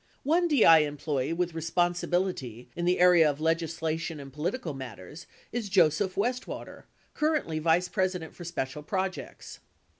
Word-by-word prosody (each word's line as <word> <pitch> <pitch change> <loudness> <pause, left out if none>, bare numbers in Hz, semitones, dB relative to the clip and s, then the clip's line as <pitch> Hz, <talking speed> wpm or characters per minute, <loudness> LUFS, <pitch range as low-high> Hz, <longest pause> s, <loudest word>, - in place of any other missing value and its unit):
One 340 +5 +2
DI 220 - +7
employee 145 -2 -1
with 175 0 -1
responsibility 170 - -1
in 175 - -2
the 180 +1 +2
area 175 -3 +6
of 145 0 -3
legislation 160 -1 -1
and 135 -1 -10
political 165 - -3
matters 130 - -9 0.2
is 230 -4 -3
Joseph 185 +1 +3
Westwater, 245 +6 -3 0.3
currently 300 - 0
vice 170 +3 +2
president 180 -3 -2
for 175 - -10
special 150 -4 -4
projects. 190 +4 -4
165 Hz, 130 wpm, -28 LUFS, 150-185 Hz, 0.3 s, DI